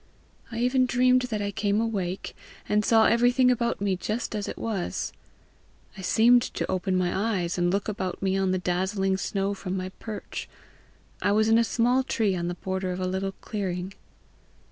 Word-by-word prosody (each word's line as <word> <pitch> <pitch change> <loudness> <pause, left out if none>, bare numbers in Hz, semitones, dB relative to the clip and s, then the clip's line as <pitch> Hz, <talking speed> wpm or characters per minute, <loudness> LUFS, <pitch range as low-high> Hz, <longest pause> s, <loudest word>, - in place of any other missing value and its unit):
I 230 - -5
even 250 +2 +2
dreamed 250 +1 +4
that 210 -2 -2
I 200 - -2
came 205 +1 0
awake, 195 -5 -2 0.3
and 210 0 +2
saw 225 +1 +5
everything 245 +2 +4
about 235 -1 0
me 200 -1 +1
just 215 +6 -3
as 210 -2 -3
it - - -5
was. 210 -6 -3 0.8
I 190 - -8
seemed 235 +6 +5
to - - -3
open 185 0 0
my 180 -1 0
eyes, 190 -4 0
and 175 0 +2
look 200 +1 -1
about 190 -3 -3
me 190 0 0
on 195 -1 +1
the 185 - +1
dazzling 190 +2 0
snow 195 +1 -1
from 190 -1 -4
my 185 0 -3
perch: 220 -2 -6 0.7
I - - +2
was 215 +1 +3
in 225 +1 +5
a - - +4
small 245 +3 +2
tree 220 -6 0
on 175 -1 -2
the 175 - -3
border 190 0 -3
of 180 - -4
a 185 - -1
little 190 +1 -2
clearing. 190 -3 -3
200 Hz, 190 wpm, -26 LUFS, 185-230 Hz, 0.8 s, saw